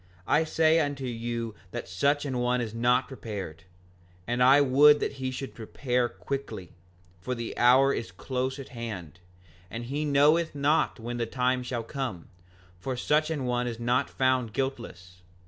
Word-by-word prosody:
I 155 +8 +3
say 160 +1 +3
unto 145 -3 -2
you 115 -1 -4 0.2
that - - -6
such 140 +11 +1
an 130 -3 -2
one 125 +1 +1
is 115 -3 -3
not 125 +2 +2
prepared; 100 - -7 0.6
and 120 +3 -1
I 135 +3 +7
would 145 +2 +6
that - - -2
he 130 - -1
should 130 +1 -6
prepare 120 +2 -1
quickly, 100 -2 -6 0.5
for 125 +9 -3
the 115 -1 -5
hour 130 +3 +5
is 100 -6 -4
close 130 +7 -3
at 135 - -9
hand, 105 -9 -7 0.5
and 115 +4 -6
he 145 +5 -2
knoweth 150 +3 +3
not 145 -1 +1
when 120 +2 -5
the 115 -1 -1
time 125 +1 0
shall 125 -2 -4
come; 120 - -5 0.5
for 125 +6 -4
such 150 +5 +1
an 150 -5 -2
one 125 0 0
is 115 -1 -5
not 120 +2 +1
found 130 -4 +1
guiltless. 100 -9 -5
125 Hz, 165 wpm, -28 LUFS, 115-140 Hz, 0.6 s, I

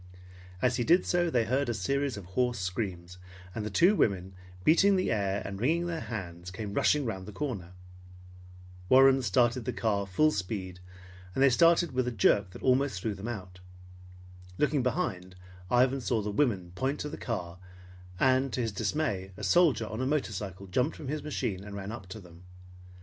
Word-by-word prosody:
As 125 -1 +2
he 120 - +1
did 175 +7 +4
so, 175 -1 +1
they 120 -7 +1
heard 130 +3 0
a 120 - -1
series 135 +5 -1
of 100 - -8
hoarse 120 +6 0
screams, 90 -2 -4 0.3
and 110 - -4
the 105 - -3
two 175 - +4
women, 95 - 0 0.3
beating 195 - +5
the 185 -7 0
air 100 -2 -1
and 100 0 -6
wringing 165 +7 +1
their 170 -2 -3
hands, 90 - -6
came 100 +2 -6
rushing 150 +5 +2
around 95 -5 -4
the - - -7
corner. 100 -8 -5 1.2
Warren 135 +1 +6
started 120 -1 +2
the 125 - -1
car 100 -3 -1
full 155 +12 +3
speed, 95 -4 -4 0.6
and 135 - +3
they 140 - +6
started 170 +5 +4
with 130 -1 0
a - - 0
jerk 100 -2 +3
that 90 - -12
almost 130 -4 +2
threw 110 +3 -2
them 100 +3 -7
out. 90 -6 -7 1.0
Looking 150 -2 +2
behind, 95 - -2 0.3
Ivan 130 +3 +3
saw 115 -2 0
the 105 - -3
women 100 -8 0
point 135 +10 -2
to 150 - -4
the - - -6
car 90 -7 -5 0.6
and 130 0 +3
to 125 - -1
his 115 -2 -1
dismay 100 -4 -2
a 105 - -8
soldier 140 - +3
on 110 +3 -5
a 130 - 0
motorcycle 105 - -3
jumped 125 - -1
from 145 - -7
his 150 +1 -2
machine 100 -10 -3
and 100 0 -8
ran 100 +1 -5
up 110 -5 -8
to 95 +4 -8
them. 85 -3 -15
115 Hz, 190 wpm, -29 LUFS, 95-135 Hz, 1.2 s, Warren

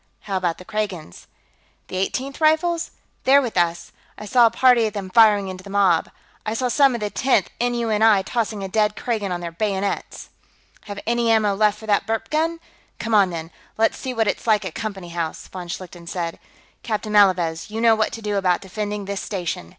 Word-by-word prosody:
"How 195 - -4
about 175 -3 -1
the 185 - -12
Kragans?" 190 - -5 0.6
"The - - -7
Eighteenth 265 +10 -3
Rifles? 320 +2 +2 0.3
They're 275 +2 +6
with 245 -5 -3
us. 170 -1 0 0.3
I 210 - -8
saw 240 +2 +5
a - - +2
party 235 -1 +4
of 210 - -6
them 195 -2 -5
firing 210 -2 +5
into 185 0 -7
the 200 - -11
mob; 195 -5 +2 0.3
I 215 +1 -3
saw 250 +1 0
some 275 0 +4
of 235 - -5
the 210 -1 -2
Tenth 255 -8 +1
N.U.N.I. 225 -4 +2
tossing 215 -1 -2
a - - -3
dead 210 +1 +1
Kragan 215 -5 -2
on 175 -1 -3
their 170 -1 -5
bayonets...." 195 +2 -3 0.6
"Have 205 -1 -7
any 235 0 +1
ammo 215 -2 +3
left 210 +1 +2
for 220 - -11
that 205 -2 +1
burp 225 0 -2
gun? 325 +2 0 0.4
Come 225 +1 -3
on, 200 -3 +5
then; 165 -1 -6 0.3
let's 225 0 +2
see 260 - -5
what 225 -3 0
it's 205 - -2
like 210 -3 +3
at 180 - -5
Company 195 -5 -5
House," 165 -2 -4
von 180 -2 -7
Schlichten 175 -1 -8
said. 170 -1 -4 0.4
"Captain 215 -2 -3
Malavez, 180 -5 +3
you 220 +1 -4
know 230 0 +5
what 220 -1 +1
to 225 - -7
do 205 -1 -1
about 180 -2 +2
defending 205 +1 -4
this 200 0 -4
station. 175 - -4
210 Hz, 205 wpm, -22 LUFS, 185-225 Hz, 0.6 s, They're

